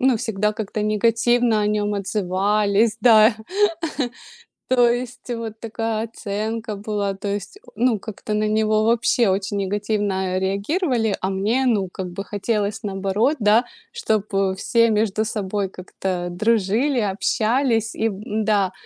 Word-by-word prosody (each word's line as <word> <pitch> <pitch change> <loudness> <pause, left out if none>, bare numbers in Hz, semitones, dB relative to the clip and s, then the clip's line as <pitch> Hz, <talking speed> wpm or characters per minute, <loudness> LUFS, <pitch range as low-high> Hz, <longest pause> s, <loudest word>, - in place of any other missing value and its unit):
Ну, 260 -2 +3
всегда 210 -2 -1
как-то 215 -1 -4
негативно 230 +1 +2
о - - +1
нём 210 0 0
отзывались. 205 +3 +1
Да. 220 -2 +6 1.3
То 245 -2 +4
есть 245 +1 -3
вот 225 -2 -5
такая 225 -1 -2
оценка 220 0 -4
была, 205 -1 -2
то 200 - -5
есть, 205 - -4
э, - - -35 0.2
ну 235 -1 +2
как-то 215 0 -6
на 215 0 +1
него 215 0 +2
вообще 235 0 +3
очень 195 +1 -1
негативно 195 -2 -1
реагировали, 220 - 0
а 190 - -1
мне, 215 +7 0
ну 205 -6 +1
как 190 - -5
бы 195 +3 -6
хотелось 205 +1 -2
наоборот, 200 +8 0
да, 215 +3 +4 0.3
чтобы 205 - 0
все 230 +3 +2
между 215 0 +1
собой 205 -2 -2
как-то 185 -1 -4
дружили, 225 +7 +1
общались. 225 +2 +1
И 225 - 0
б 200 0 -7
да, 210 -3 +1
215 Hz, 135 wpm, -22 LUFS, 200-230 Hz, 1.3 s, Да